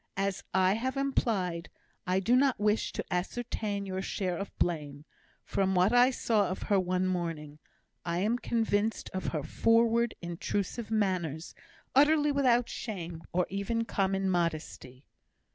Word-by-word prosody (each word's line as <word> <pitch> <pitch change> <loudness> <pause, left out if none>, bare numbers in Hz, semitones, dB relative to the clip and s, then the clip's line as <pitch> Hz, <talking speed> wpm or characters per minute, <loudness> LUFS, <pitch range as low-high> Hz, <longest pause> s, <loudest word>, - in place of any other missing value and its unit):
"As 195 -1 -1
I 190 0 +3
have 260 +5 -2
implied, 195 -11 0 0.4
I 185 +1 +2
do 230 +6 +3
not 265 -2 +3
wish 210 +1 +1
to - - -4
ascertain 200 +1 -2
your 190 -1 -3
share 185 -2 -2
of 200 +3 -4
blame; 150 -4 -2 0.4
from 190 -1 0
what 185 +5 +4
I 245 +1 +6
saw 220 -5 +1
of 185 - -4
her 200 -2 +2
one 185 0 0
morning, 165 -5 -3 0.4
I 170 0 -2
am 215 +6 +1
convinced 225 -2 0
of 185 - -3
her 155 -4 -2
forward, 230 +3 +2
intrusive 190 +6 -3
manners, 180 -7 -1 0.4
utterly 295 +2 +5
without 250 -4 +3
shame, 175 -7 -6
or 180 0 +1
even 215 +4 -1
common 195 -2 0
modesty." 155 -7 -2
195 Hz, 145 wpm, -30 LUFS, 175-230 Hz, 0.4 s, I